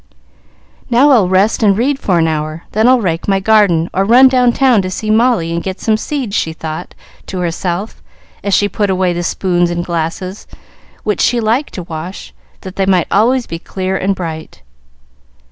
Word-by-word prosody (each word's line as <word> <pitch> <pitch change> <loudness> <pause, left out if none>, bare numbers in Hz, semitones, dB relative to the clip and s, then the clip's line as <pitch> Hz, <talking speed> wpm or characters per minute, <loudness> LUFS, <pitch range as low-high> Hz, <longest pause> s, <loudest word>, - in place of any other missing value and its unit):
"Now, 255 +5 +4
I'll 215 -9 +4
rest 195 +5 +2
and 200 -3 +3
read 270 +4 0
for 185 -8 0
an 165 -1 +2
hour, 155 +1 -3
then 220 +3 +2
I'll 255 -1 +4
rake 170 -4 -2
my 195 -1 +2
garden, 195 -5 +3
or 190 - +1
run 245 +6 +6
down 250 -2 +3
town 250 -4 +3
to 185 - -4
see 215 +3 -3
Molly 215 -7 +2
and 170 - -2
get 190 +1 -5
some 220 - +1
seeds," 235 -2 -4
she 160 - -1
thought 160 0 -7 0.3
to 190 - -5
herself, 180 +3 -3 0.4
as 200 -1 +1
she 205 - +2
put 205 +1 -2
away 185 -1 +1
the 175 - -3
spoons 175 0 0
and 175 0 -3
glasses, 170 +3 -4 0.6
which 210 - -1
she 245 - +2
liked 230 +6 -1
to 180 - -5
wash, 165 +3 -8 0.3
that 190 -1 -10
they 195 -1 0
might 185 -3 +3
always 240 +5 +2
be 165 - -6
clear 185 +2 -4
and 195 +1 0
bright. 160 - -7
190 Hz, 190 wpm, -15 LUFS, 175-220 Hz, 0.6 s, run